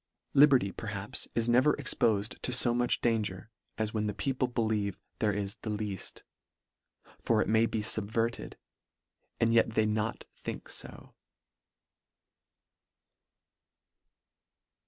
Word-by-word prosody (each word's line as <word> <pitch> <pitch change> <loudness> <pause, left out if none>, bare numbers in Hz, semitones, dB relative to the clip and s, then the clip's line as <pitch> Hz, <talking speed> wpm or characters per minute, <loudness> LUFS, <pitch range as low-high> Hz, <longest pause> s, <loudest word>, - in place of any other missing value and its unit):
Liberty, 135 -8 +5
perhaps, 105 -2 -4
is 115 0 +1
ne 120 +1 +5
ver 150 +3 +4
expofed 115 -5 0
to - - -1
fo 125 -1 +3
much 120 0 +1
danger, 110 -3 -1 0.3
as 110 -1 -2
when 105 -1 -1
the 105 - -3
people 130 -2 -1
believe 110 -5 -1 0.2
there 105 - +2
is 100 -1 -2
the 110 - -7
leaft; 105 -3 -4 1.0
for 115 -2 +1
it - - +1
may 110 +1 +3
be 110 - -2
fubverted, 110 +2 +1 0.8
and 115 0 +3
yet 115 -1 +3
they 110 - +3
not 110 +1 -1
think - - -7
fo. - - -9
110 Hz, 120 wpm, -30 LUFS, 105-120 Hz, 1.0 s, Liberty